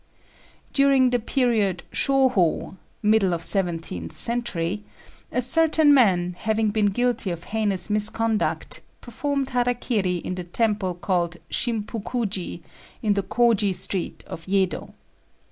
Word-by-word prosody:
During 275 -2 +4
the 245 - +1
period 220 -7 0
Shôhô 255 -12 +2 0.3
(middle 210 -4 +3
of 165 - -7
seventeenth 165 - +1
century), 210 -5 -1 0.5
a 250 - 0
certain 315 +2 +4
man, 180 -9 +3
having 220 -1 0
been 210 -1 +2
guilty 240 0 +1
of 170 -1 -5
heinous 210 -4 0
misconduct, 215 +1 -1 0.2
performed 275 +3 -3
hara 245 0 +1
kiri 205 -7 -1
in 175 +1 -4
the 180 -1 -5
temple 195 0 -1
called 175 -1 -1
Shimpukuji, 215 -5 -3 0.4
in 210 -2 +2
the 200 - 0
Kôji 210 -2 +1
street 185 -1 -4
of 165 - -9
Yedo. 190 -1 -1
210 Hz, 120 wpm, -23 LUFS, 185-245 Hz, 0.5 s, During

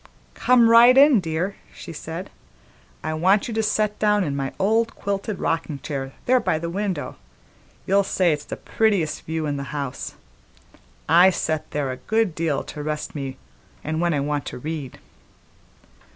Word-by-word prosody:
"Come 250 -2 +4
right 235 +3 +7
in, 275 -4 +7
dear," 175 +3 -3 0.2
she - - -9
said. 165 +4 -7 0.7
"I 155 - -2
want 190 +6 +2
you 235 - -4
to 220 - +1
set 210 -1 0
down 210 -1 +3
in 145 -5 -2
my 135 -1 -2
old 225 +4 +1
quilted 200 0 -3
rockin' 160 -3 -2
chair 135 -2 -4
there 255 +1 +4
by 190 -9 0
the 170 +1 -4
window; 190 -5 -3 0.7
you'll 195 +1 +4
say 185 -3 +2
it's 150 -1 -5
the - - -6
prettiest 200 -9 0
view 160 0 -2
in 145 -1 -2
the 140 - -4
house. 140 -3 -5 0.9
I 175 +4 +7
set 160 -4 -2
there 145 -3 -2
a 130 - -5
good 220 - 0
deal 160 -3 -1
to 150 - -8
rest 150 0 -4
me 135 -3 -5 0.5
and 160 +2 -2
when 170 -2 +1
I 140 - 0
want 145 -1 -2
to - - -6
read." 145 -1 -6
165 Hz, 170 wpm, -23 LUFS, 150-210 Hz, 0.9 s, right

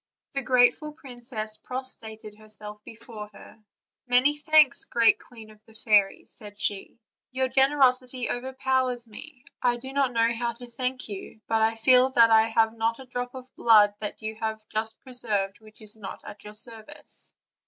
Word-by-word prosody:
The 275 - +1
grateful 255 +5 +3
princess 240 -6 -5
prostrated 220 -4 -7
herself 210 0 -7
before 220 -1 -10
her. 215 +2 -15 0.4
"Many 250 +4 +4
thanks, 300 -2 +4
great 230 -1 +3
queen 225 -3 -14
of 215 0 -20
the 225 - -20
fairies," 210 -3 +2
said 205 -1 -11
she, 200 +1 -3 0.3
"your 260 0 0
generosity 260 -2 +2
overpowers 260 -1 -1
me; 270 +5 -12 0.2
I 240 -1 +2
do 265 +2 -9
not 275 -2 +1
know 230 0 +2
how 235 0 -2
to 245 +2 -10
thank 255 +2 -3
you, 205 +1 -8
but 225 0 +1
I 220 +1 +2
feel 250 +3 +5
that 230 -2 +6
I 220 0 +6
have 225 0 +2
not 225 0 0
a 265 - -11
drop 245 0 -5
of 255 0 -11
blood 210 -3 +5
that 215 +1 -6
you 215 0 -3
have 220 -1 -4
just 220 +1 -2
preserved 215 -7 -1
which 215 0 -16
is 215 0 -5
not 205 -3 -9
at 205 - -11
your 210 0 -11
service.' 230 +6 -4
230 Hz, 170 wpm, -26 LUFS, 215-255 Hz, 0.4 s, that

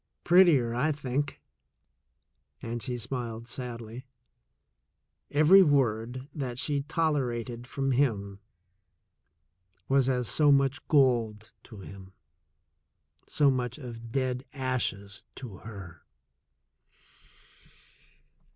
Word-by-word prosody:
"Prettier, 170 -10 +5
I 135 +6 +1
think," 140 0 -3 1.2
and 115 0 -5
she 125 0 -3
smiled 115 -1 -5
sadly. 120 0 -7 1.2
Every 155 +7 +7
word 130 - +1
that 130 -5 -4
she 145 +1 -1
tolerated 130 -6 -2
from 135 +1 -1
him 105 -7 0 1.5
was 135 -1 +3
as 125 -2 0
so 150 -2 +4
much 140 +1 +2
gold 115 -7 +2
to 110 -5 -11
him, 95 0 -11 1.1
so 145 -2 +3
much 125 -1 -2
of 115 -4 -9
dead 130 0 -1
ashes 125 -7 -2
to 115 -8 -8
her. 95 -6 -10
125 Hz, 90 wpm, -28 LUFS, 115-140 Hz, 1.5 s, Every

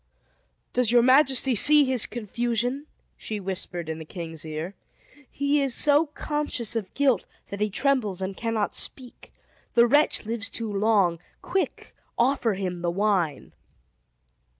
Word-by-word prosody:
"Does 245 -3 +1
your 240 -1 +5
majesty 265 0 +4
see 295 +6 +6
his 255 -3 0
confusion?" 240 +4 -2 0.3
she 215 -1 -5
whispered 180 -3 -4
in 160 0 -4
the - - -6
king's 165 -1 -8
ear. 160 +4 -5 0.6
"He 280 +1 +1
is 270 -4 0
so 295 +2 +4
conscious 295 -6 -3
of 205 -5 -3
guilt, 265 -8 +2 0.2
that 200 - -6
he 210 - +1
trembles 220 -4 0
and 190 0 -4
cannot 225 -2 -1
speak. 255 -3 -5 0.4
The 235 0 +7
wretch 290 -1 +3
lives 225 0 -3
too 225 -3 -5
long! 200 -5 +2 0.2
Quick! 380 +1 -3 0.2
offer 240 -3 +2
him 180 -2 -4
the 175 - 0
wine!" 185 -5 0
225 Hz, 140 wpm, -25 LUFS, 190-265 Hz, 0.6 s, The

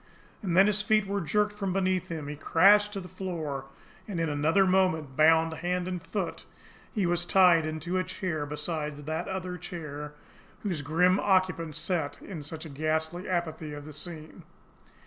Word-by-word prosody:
And 180 -4 -1
then 190 - +8
his 210 0 +2
feet 215 0 +3
were 200 0 -1
jerked 210 +5 +1
from 195 -3 -2
beneath 185 -1 +1
him, 160 -4 -5
he 150 - -5
crashed 200 +7 +5
to 200 - -3
the 180 - -8
floor, 160 -7 -4 0.4
and, 195 -5 -3
in 165 -1 0
another 155 +7 +3
moment, 185 -7 +2
bound 160 +2 +5
hand 180 +2 -2
and 180 -2 -3
foot, - - -4 0.5
he 205 -5 0
was 175 0 +1
tied 175 -3 +5
into 160 +4 -2
a - - +1
chair 160 -6 -3
beside 150 0 -3
that 155 +4 -4
other 185 -2 -4
chair 150 -4 -7 0.5
whose 180 -8 -2
grim 180 +6 +3
occupant 185 -5 +1
sat 160 -3 -2
in 180 -6 -7
such 155 0 -7
ghastly 160 +5 -1
apathy 160 -4 -2
of 145 0 -8
the 155 - -9
scene. 155 +1 -9
170 Hz, 170 wpm, -28 LUFS, 155-185 Hz, 0.5 s, then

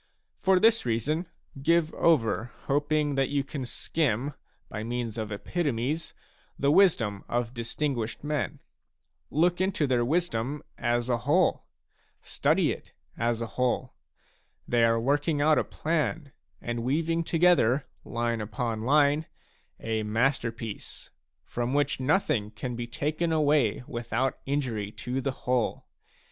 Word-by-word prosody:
For 190 -1 +4
this 225 +3 +4
reason, 140 - -1 0.3
give 165 +2 +2
over 120 -8 +2 0.2
hoping 145 +1 +1
that 135 -1 +1
you 140 -1 +1
can 135 -2 -5
skim, 135 0 -1 0.3
by 105 - -5
means 120 -1 -3
of 110 -2 -4
epitomes», 145 - -2 0.4
the 140 +1 +2
wisdom 115 - +3
of 120 0 -1
distin 130 +5 -2
guished 115 +2 -4
men. 150 -2 -2 0.7
Look 175 +4 +2
into 185 -5 +1
their 125 -3 +2
wisdom 145 -2 0
as 120 0 0
a 120 -2 +2
whole; 160 +9 +2 0.5
study - - +1
it - - -8 0.2
as 120 0 0
a - - 0
whole. 125 +2 -1 0.7
They 120 -1 +3
are 115 0 +3
working 145 +5 +1
out 155 +1 +4
a - - +1
plan 155 -2 -2 0.3
and 120 0 -3
weaving 165 +7 0
together, 160 -7 +3 0.2
line 115 -1 -1
upon 110 +1 -3
line, 145 +4 +3 0.5
a 110 -1 -1
masterpiece, 115 0 -2 0.3
from 120 0 -2
w.hich 145 -1 +1
nothing 130 - +1
can 120 +3 -5
be 120 0 -4
taken 155 +7 -1
away 145 -7 +2
without 120 +2 -2
injury 120 -8 -1
to 125 +2 -3
the 135 - -1
whole. 125 -2 0
130 Hz, 130 wpm, -28 LUFS, 115-150 Hz, 0.7 s, For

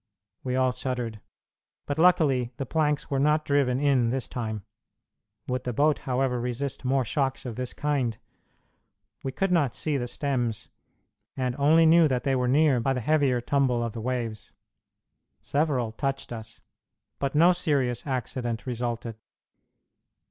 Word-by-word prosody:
We 125 -1 -2
all 130 -1 +3
shuddered, 125 -4 -4 0.6
but 145 +2 -3
luckily 145 -8 +3
the 135 - -3
planks 150 0 0
were 135 - +1
not 150 +2 +2
driven 135 -3 +2
in 135 -5 +3
this 130 +1 -2
time. 110 -4 -4 0.8
Would 125 0 -2
the 125 - -3
boat, 145 +4 +2
however, 125 -1 0
resist 125 +4 -3
more 130 0 +1
shocks 135 +2 -1
of 120 -3 -5
this 125 0 -3
kind? 135 -7 -1 1.1
We 135 - -2
could 195 +7 -1
not 145 -8 +2
see 150 -3 -1
the 120 -2 -3
stems, 120 -4 -2 0.7
and 125 -2 -1
only 160 +3 +5
knew 165 0 +6
that 130 -3 -1
they 135 -1 +1
were 125 -1 +1
near 140 0 +4
by 135 +3 +1
the 130 - -2
heavier 140 -2 +2
tumble 125 -2 +1
of 115 -2 -3
the 115 - -5
waves. 115 -3 -4 0.9
Several 140 -6 0
touched 135 +1 -3
us, 110 0 -9 0.6
but 140 +1 -2
no 170 +4 +6
serious 140 -8 0
accident 120 -3 -3
resulted. 120 -2 -3
130 Hz, 150 wpm, -26 LUFS, 120-145 Hz, 1.1 s, knew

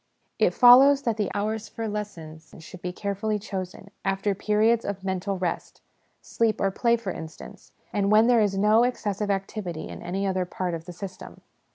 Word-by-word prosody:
It - - +2
follows 270 +3 +7
that 230 -2 -1
the 210 -3 -1
hours 215 +1 -2
for 225 -1 -5
lessons 165 -7 -7
should 170 +2 -12
be 180 - -3
carefully 200 +3 -2
chosen, 195 -1 -7
after 195 +1 0
periods 220 +4 +2
of 200 -1 -5
mental 190 +1 -2
rest 180 -2 -4 0.4
sleep 225 -2 0
or 195 - +1
play, 235 +4 +2
for 215 -5 -5
instance 160 -2 -10 0.2
and 200 0 +1
when 215 +1 +6
there 240 -2 +4
is 200 -2 +1
no 210 +3 +4
excessive 210 -4 -2
activity 195 -4 -3
in - - -9
any 190 +3 -3
other 185 -1 0
part 180 0 -4
of 165 -1 -6
the 180 - -8
system. 190 +2 -9
200 Hz, 180 wpm, -25 LUFS, 185-215 Hz, 0.4 s, follows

